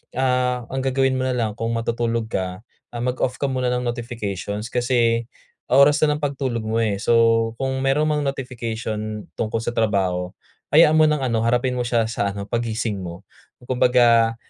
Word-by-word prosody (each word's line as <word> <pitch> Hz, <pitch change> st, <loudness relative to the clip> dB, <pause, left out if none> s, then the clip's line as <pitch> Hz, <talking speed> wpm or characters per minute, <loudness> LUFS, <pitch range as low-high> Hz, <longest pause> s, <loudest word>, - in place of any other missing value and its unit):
ah, 125 Hz, -1 st, +1 dB
ang 135 Hz, -, -3 dB
gagawin 135 Hz, 0 st, +1 dB
mo 130 Hz, -, -1 dB
na 130 Hz, -, 0 dB
lang 115 Hz, -3 st, 0 dB
kung 115 Hz, 0 st, -2 dB
matutulog 115 Hz, 0 st, -1 dB
ka, 95 Hz, +1 st, -3 dB, 0.3 s
ah, 120 Hz, -, -4 dB
mag-off 125 Hz, 0 st, -1 dB
ka 140 Hz, -, +1 dB
muna 130 Hz, -1 st, -1 dB
ng 125 Hz, -, -1 dB
notifications, 115 Hz, -3 st, -4 dB
kasi 120 Hz, -2 st, +1 dB, 0.4 s
oras 140 Hz, +3 st, +5 dB
na 150 Hz, -, +1 dB
ng 150 Hz, -, -8 dB
pagtulog 130 Hz, -5 st, -2 dB
mo, 110 Hz, +1 st, -1 dB
eh. 110 Hz, -3 st, +1 dB
So, 115 Hz, +2 st, +3 dB
kung 135 Hz, 0 st, -1 dB
meron 140 Hz, +3 st, +2 dB
mang 150 Hz, -1 st, 0 dB
notification 110 Hz, -5 st, -4 dB
tungkol 110 Hz, 0 st, -2 dB
sa 120 Hz, -, -2 dB
trabaho, 95 Hz, -4 st, 0 dB, 0.4 s
hayaan 155 Hz, 0 st, +7 dB
mo 155 Hz, -, +6 dB
ng 150 Hz, -2 st, +1 dB
ano, 115 Hz, -3 st, 0 dB
harapin 125 Hz, +2 st, +1 dB
mo 125 Hz, -, -1 dB
siya 115 Hz, -1 st, +2 dB
sa 100 Hz, -3 st, -1 dB
ano, 100 Hz, 0 st, -5 dB
paggising 115 Hz, -3 st, -2 dB
mo. 90 Hz, +1 st, -8 dB, 0.4 s
Kumbaga, 120 Hz, -2 st, +3 dB
120 Hz, 175 wpm, -22 LUFS, 110-130 Hz, 0.4 s, hayaan